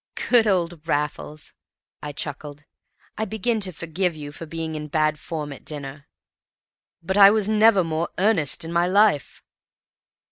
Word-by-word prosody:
"Good 235 -3 +6
old 170 -4 -1
Raffles!" 150 0 -3 0.5
I 150 - -5
chuckled. 145 0 -7 0.6
"I 220 - 0
begin 220 +2 -1
to 190 -3 -2
forgive 170 +2 -2
you 145 -1 -8
for 160 +3 -9
being 160 0 -4
in 150 -1 -5
bad 155 0 0
form 150 -3 -5
at - - -13
dinner." 145 -1 -8 1.0
"But 190 +4 -1
I 200 -1 +10
was 210 -1 +1
never 215 -2 +5
more 165 0 -2
earnest 180 -7 +1
in 165 - -6
my 170 +1 +2
life." 200 -6 +2
165 Hz, 150 wpm, -23 LUFS, 150-195 Hz, 1.0 s, I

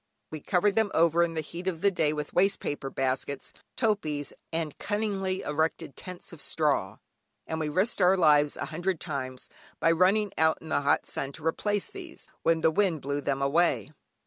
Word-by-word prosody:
We 155 - -5
covered 185 +6 +2
them 220 0 +2
over 165 +1 +4
in 170 -1 +1
the 160 - 0
heat 170 +4 -8
of 170 -3 -2
the 200 0 +4
day 160 -5 +1
with 150 -1 -4
waste 195 +2 +3
paper 140 -2 -4
baskets, 135 +1 -2 0.2
topees, 155 - 0 0.2
and 160 -3 -2
cunningly 200 -3 -1
erected 150 -1 -1
tents 180 -1 -8
of 160 - -9
straw, 150 0 0 0.5
and 160 - -3
we 155 -1 -1
risked 190 +8 +1
our 185 +1 +5
lives 150 -4 +4
a - - -3
hundred 175 +1 -1
times, 130 -5 -5 0.3
by 165 - +4
running 190 +5 +3
out 160 0 +4
in 160 - -11
the - - +1
hot 145 0 +2
sun 140 +1 -2
to 155 - -11
replace 205 +5 0
these, 360 -4 -9
when 165 -1 +2
the 160 - +4
wind 175 -4 +1
blew 140 +1 -2
them 140 -1 -1
away. 140 - +2
160 Hz, 190 wpm, -28 LUFS, 150-190 Hz, 0.5 s, our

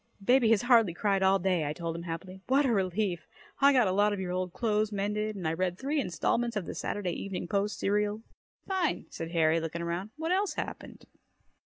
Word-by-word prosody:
"Baby 245 +1 +4
has 225 -1 +4
hardly 230 -8 +4
cried 195 0 +1
all 190 +1 +4
day!" 180 -3 +1
I 150 0 -2
told 165 +1 -4
him 170 - -5
happily. 180 +3 -7
"What 275 +3 +3
a 250 - +2
relief! 190 -2 -1 0.3
I 280 0 +6
got 250 -6 +4
a - - +1
lot 205 +2 +3
of 205 - -3
your 185 -1 -3
old 185 0 -2
clothes 215 +1 0
mended 210 +1 -2
and 180 -5 -3
I 160 - 0
read 180 +1 -1
three 285 +4 -1
installments 235 +4 -1
of 200 -4 -2
the - - -5
Saturday 190 -4 -3
Evening 185 0 -4
Post 200 +1 -1
serial." 210 +2 0 0.4
"Fine!" 375 -4 0
said 165 - -5
Harry, 165 -1 +3
looking 165 +1 -4
around. 170 +4 -3
"What 325 +2 -2
else 390 +2 +1
happened?" - - -6
195 Hz, 210 wpm, -29 LUFS, 175-225 Hz, 0.4 s, I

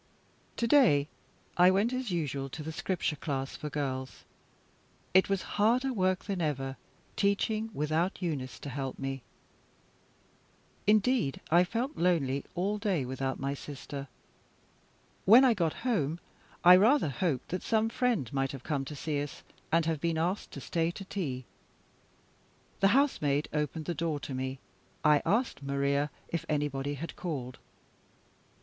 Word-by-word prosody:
To 235 - +1
day 215 - +5 0.5
I 180 +1 +7
went 200 +6 +2
as 255 -2 -2
usual 140 -6 -2
to 155 +4 -7
the 160 - -4
Scripture 175 -1 -1
class 135 -2 -3
for 150 - -5
girls. 130 -3 -4 0.9
It 190 +1 +5
was 195 -1 0 0.2
harder 250 +5 +3
work 185 -3 +1
than 195 -4 -2
ever, 135 -4 -1 0.4
teaching 215 +2 +1
without 160 +3 0
Eunice 145 -8 -3
to 145 - -6
help 135 0 -4
me. 135 -1 -4 1.7
Indeed, 215 - +3
I 175 +2 +6
felt 240 - -3
lonely 145 -6 +1
all 200 +4 0
day 190 - 0
without 130 +1 -3
my 135 +1 -1
sister. 140 0 -7 1.2
When 235 +7 +8
I 250 - +5
got 170 -7 0
home, 165 - 0 0.4
I 180 +1 +10
rather 225 - +4
hoped 140 -2 -1
that 185 - -2
some 220 -1 +2
friend 225 - 0
might 135 0 0
have 135 -2 -8
come 145 -4 -1
to 150 - -7
see 145 0 -2
us, 145 0 -7 0.3
and 165 0 +3
have 160 -3 -1
been 165 -1 0
asked 175 +5 -1
to - - -7
stay 165 -1 0
to 195 +3 -7
tea. 140 -11 -4 1.3
The 195 - +5
housemaid 150 - +1
opened 150 +1 -2
the 175 - -1
door 160 -1 -1
to 135 - -5
me. 130 +1 -3 0.5
I 150 -1 +5
asked 225 - +1
Maria 140 +1 0 0.2
if 170 -1 -3
anybody 145 -1 -1
had 165 +5 -6
called. 135 -8 -5
160 Hz, 150 wpm, -30 LUFS, 140-195 Hz, 1.7 s, I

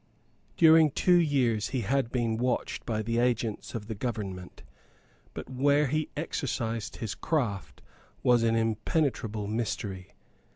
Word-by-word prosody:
During 160 -1 +7
two 175 +5 +3
years 125 -10 +1
he 130 - -2
had 125 +2 0
been 115 -3 0
watched 125 +1 -2
by 110 -2 -1
the 115 +2 0
agents 120 -3 -1
of 110 -3 -4
the 110 - -5
government; 100 -5 -5 0.7
but - - -6
where 140 +3 +2
he 155 +3 -1
exercised 115 -7 -3
his 110 -3 -4
craft 100 - -2 0.4
was 120 -1 +4
an 115 0 +2
impenetrable 115 - -1
mystery. 105 -4 -4
115 Hz, 130 wpm, -28 LUFS, 110-135 Hz, 0.7 s, During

